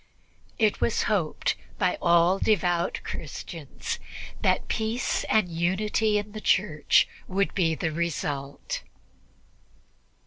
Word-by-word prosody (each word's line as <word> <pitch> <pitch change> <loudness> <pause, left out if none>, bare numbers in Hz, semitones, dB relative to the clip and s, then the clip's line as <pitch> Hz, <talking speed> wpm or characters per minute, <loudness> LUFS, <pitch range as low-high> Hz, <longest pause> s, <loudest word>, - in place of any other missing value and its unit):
It 215 -2 +2
was 230 - +2
hoped 185 -8 0 0.2
by 185 -2 +1
all 170 +2 +4
devout 175 -4 +1
Christians - - -6 0.4
that - - +2
peace 225 +3 -1
and 215 -4 +3
unity 195 +5 +1
in 205 0 -3
the 215 0 -7
Church 180 -8 +3 0.2
would 195 +1 0
be 165 -4 +2
the 160 +1 -1
result. 145 -4 -3
185 Hz, 105 wpm, -27 LUFS, 170-210 Hz, 0.4 s, all